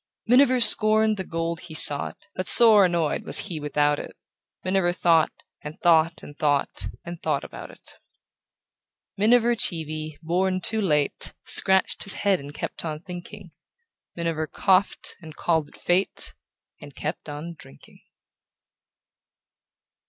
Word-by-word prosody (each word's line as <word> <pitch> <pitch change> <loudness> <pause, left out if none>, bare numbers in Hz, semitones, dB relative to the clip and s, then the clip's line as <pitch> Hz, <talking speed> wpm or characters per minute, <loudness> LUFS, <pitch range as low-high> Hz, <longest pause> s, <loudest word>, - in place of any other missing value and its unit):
Miniver 255 +2 +4
scorned 215 -2 +5
the 190 - -4
gold 165 -1 -4
he 160 -3 -10
sought, 145 -2 +3
But 185 0 -5
sore 220 -4 +7
annoyed 170 -3 -1
was - - +1
he 165 -4 -2
without 145 0 0
it; - - -10 0.5
Miniver 185 -1 0
thought, 165 -2 +2 0.3
and 150 +4 -10
thought, 165 -1 +2
and 145 - -12
thought, 145 -2 -1 0.2
And 170 -1 -9
thought 150 -3 -2
about - - -10
it. - - -15 1.2
Miniver 235 +3 +2
Cheevy, 155 -6 -2
born 185 +3 -1
too 220 +4 0
late, 150 -7 0
Scratched 190 0 +2
his 200 - +1
head 200 -3 0
and 140 +1 -10
kept - - -7
on 155 -2 -6
thinking; 180 +1 -11 0.6
Miniver 165 -2 -3
coughed, 190 +3 0
and 155 -2 -12
called 160 -3 -1
it - - -19
fate, 180 +3 -2 0.5
And 145 -2 -13
kept 155 0 -6
on 150 +4 -7
drinking. 70 - -18
170 Hz, 135 wpm, -23 LUFS, 155-195 Hz, 1.2 s, sore